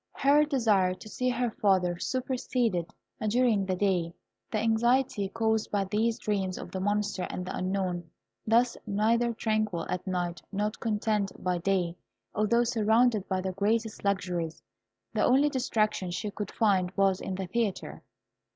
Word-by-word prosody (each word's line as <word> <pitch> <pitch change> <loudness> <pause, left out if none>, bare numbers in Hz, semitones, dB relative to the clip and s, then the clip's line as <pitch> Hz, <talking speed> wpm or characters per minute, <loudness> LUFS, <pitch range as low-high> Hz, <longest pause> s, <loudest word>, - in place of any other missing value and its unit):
Her 285 +2 +4
desire 215 -10 +2
to 200 - -12
see 250 +4 -1
her 245 -1 0
father 185 -5 +1
superseded, 245 -8 -1 0.4
during 225 -4 +2
the 185 - 0
day, 180 -3 0 0.4
the 220 - 0
anxiety 225 -1 +2
caused 220 0 0
by 205 -1 +1
these 220 +4 0
dreams 195 -3 -1
of - - -8
the 190 - -3
Monster 205 -1 -1
and 180 - -4
the 185 - -4
Unknown. 185 -2 -2 0.4
Thus, 235 +2 +3
neither 225 +4 +2
tranquil 215 -6 -1
at 180 +1 -3
night 175 -3 -2
nor 210 +1 0
contented 210 -2 -2
by 180 -1 0
day, 175 -1 0 0.4
although 225 +3 +2
surrounded 225 -2 +2
by 190 -1 0
the 190 0 -2
greatest 215 +3 -1
luxuries, 180 -6 -1 0.5
the 215 - +1
only 275 +4 +4
distraction 215 -8 0
she 175 +4 -3
could 210 0 -5
find 195 -5 +2
was 195 -1 +3
in 190 - -4
the 190 0 -3
theatre. 190 -5 -2
205 Hz, 150 wpm, -29 LUFS, 185-230 Hz, 0.5 s, Her